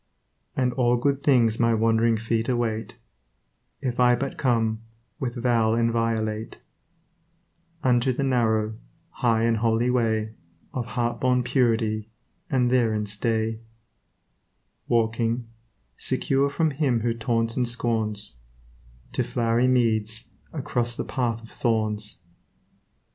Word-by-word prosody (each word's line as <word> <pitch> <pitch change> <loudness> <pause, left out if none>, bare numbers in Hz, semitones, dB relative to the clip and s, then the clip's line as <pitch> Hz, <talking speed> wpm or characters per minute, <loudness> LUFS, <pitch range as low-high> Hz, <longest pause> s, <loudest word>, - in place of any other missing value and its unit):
And 125 -1 +1
all 120 -1 +2
good 140 +3 0
things 120 -6 +3
my 115 -1 +3
wandering 115 +1 +3
feet 115 +2 -1
await, 115 -3 -1 0.9
If 125 -3 -2
I 125 0 +5
but 135 +3 -3
come, 115 -3 +1 0.4
with 125 -5 -3
vow 115 -2 +2
inviolate, 115 -1 -1 1.2
Unto 125 0 +3
the 130 +3 -2
narrow, 110 -4 +1 0.3
high 115 -3 +1
and 115 -1 +2
holy 115 +2 +2
way 110 -3 0 0.4
Of 125 -2 -3
heart 120 -1 -2
born 125 -1 +2
purity, 115 -4 +1 0.4
and 125 -2 +2
therein 110 -4 +2
stay; 110 +1 -1 1.3
Walking, 115 +1 +1 0.5
secure 135 +1 +1
from 160 +2 +1
him 135 -5 +1
who 115 0 +1
taunts 115 0 -1
and 125 -2 +1
scorns, 110 - -1 0.7
To - - 0
flowery 120 +1 +1
meads, 115 -3 +1 0.2
across 125 -5 -2
the - - -3
path 115 -3 -2
of 115 - -13
thorns. 110 -4 -1
115 Hz, 115 wpm, -25 LUFS, 110-125 Hz, 1.3 s, I